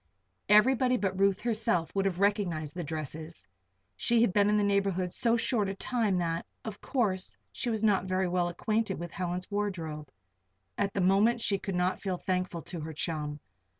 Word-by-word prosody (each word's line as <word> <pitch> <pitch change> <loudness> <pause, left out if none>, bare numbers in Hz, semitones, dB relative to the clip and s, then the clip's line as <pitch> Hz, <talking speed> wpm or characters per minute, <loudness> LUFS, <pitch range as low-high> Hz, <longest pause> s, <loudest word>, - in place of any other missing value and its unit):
Everybody 250 +4 +5
but 190 -3 -2
Ruth 195 0 +3
herself 210 -8 0
would 195 0 0
have 185 -2 -1
recognized 190 -7 0
the 175 - -4
dresses; 155 -4 -6 0.5
she 235 - +2
had 230 -6 +3
been 205 0 +4
in 210 - +3
the 210 - +2
neighborhood 195 -3 +1
so 235 -1 +2
short 220 -3 0
a 195 - -4
time 220 -3 0
that, 165 -1 -1 0.2
of 215 -2 -6
course, 195 -8 -1
she 245 - -3
was 220 -1 -1
not 200 -4 +3
very 185 0 0
well 175 0 +1
acquainted 215 +3 -1
with 170 0 -6
Helen's 180 +1 -4
wardrobe. 165 -8 -3 0.7
At 200 -1 -1
the 200 - +1
moment 200 +6 +4
she 200 -3 0
could 195 -1 -4
not 180 +1 0
feel 190 -3 -2
thankful 180 -2 -2
to 175 - -6
her 160 +1 -6
chum. 150 -2 -3
190 Hz, 185 wpm, -30 LUFS, 175-210 Hz, 0.7 s, Everybody